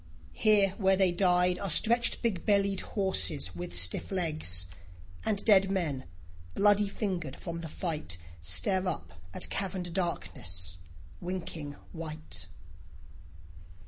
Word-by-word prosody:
Here 205 Hz, -3 st, +5 dB
where 190 Hz, -1 st, +4 dB
they 190 Hz, -2 st, +4 dB
died 180 Hz, 0 st, +3 dB
Are 200 Hz, -, -3 dB
stretched 235 Hz, +10 st, +4 dB
big 205 Hz, -7 st, 0 dB
bellied 200 Hz, -2 st, +2 dB
horses 190 Hz, -, +1 dB
with 85 Hz, 0 st, -5 dB
stiff 90 Hz, -, +2 dB
legs; 155 Hz, -, 0 dB, 0.6 s
And 210 Hz, -2 st, -1 dB
dead 195 Hz, -3 st, +5 dB
men, 160 Hz, -9 st, -1 dB, 0.5 s
bloody 205 Hz, 0 st, +4 dB
fingered 180 Hz, -, -3 dB
from 170 Hz, -1 st, -6 dB
the 165 Hz, -, -6 dB
fight, 150 Hz, -, -3 dB, 0.2 s
Stare 90 Hz, -, +1 dB
up 85 Hz, -, -4 dB, 0.2 s
at -, -, -4 dB
caverned 185 Hz, -3 st, -2 dB
darkness 90 Hz, -, -3 dB, 0.4 s
winking 170 Hz, -5 st, -5 dB, 0.2 s
white. 155 Hz, -, -7 dB
175 Hz, 115 wpm, -30 LUFS, 140-195 Hz, 0.6 s, Here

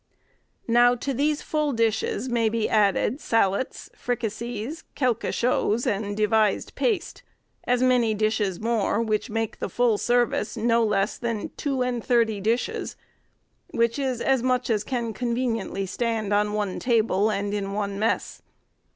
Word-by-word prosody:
Now, 240 Hz, +1 st, +5 dB
to 275 Hz, +3 st, -3 dB
these 295 Hz, +3 st, 0 dB
full 300 Hz, -2 st, 0 dB
dishes 225 Hz, +1 st, 0 dB
may 235 Hz, -3 st, +1 dB
be 225 Hz, -1 st, 0 dB
added, 215 Hz, +6 st, +2 dB
sallets, 225 Hz, +1 st, 0 dB
fricases, 235 Hz, +3 st, -4 dB
quelque 250 Hz, -4 st, 0 dB
choses, 240 Hz, -1 st, +1 dB
and 205 Hz, -3 st, -1 dB
devised 215 Hz, -1 st, +2 dB
paste, 430 Hz, -8 st, -1 dB, 0.4 s
as 250 Hz, 0 st, +2 dB
many 245 Hz, -4 st, +3 dB
dishes 210 Hz, -3 st, 0 dB
more, 225 Hz, -1 st, 0 dB
which 220 Hz, +1 st, -1 dB
make 225 Hz, 0 st, -3 dB
the -, -, -3 dB
full 235 Hz, -4 st, +2 dB
service 240 Hz, -2 st, +1 dB
no 230 Hz, +1 st, +2 dB
less 210 Hz, -1 st, 0 dB
than 230 Hz, -3 st, -3 dB
two 270 Hz, -3 st, -1 dB
and 245 Hz, -2 st, -2 dB
thirty 230 Hz, -4 st, +2 dB
dishes; 230 Hz, +4 st, -1 dB, 0.7 s
which 235 Hz, +3 st, 0 dB
is 260 Hz, -3 st, -1 dB
as 265 Hz, -2 st, +2 dB
much 250 Hz, -1 st, 0 dB
as 215 Hz, -2 st, +1 dB
can 235 Hz, -2 st, -3 dB
conveniently 235 Hz, -5 st, -2 dB
stand 220 Hz, 0 st, -1 dB
on 210 Hz, 0 st, +2 dB
one 205 Hz, -3 st, -2 dB
table, 220 Hz, -4 st, +2 dB
and 205 Hz, -1 st, -2 dB
in 200 Hz, -1 st, -2 dB
one 200 Hz, -1 st, -2 dB
mess. 220 Hz, +2 st, -1 dB
230 Hz, 145 wpm, -25 LUFS, 210-245 Hz, 0.7 s, Now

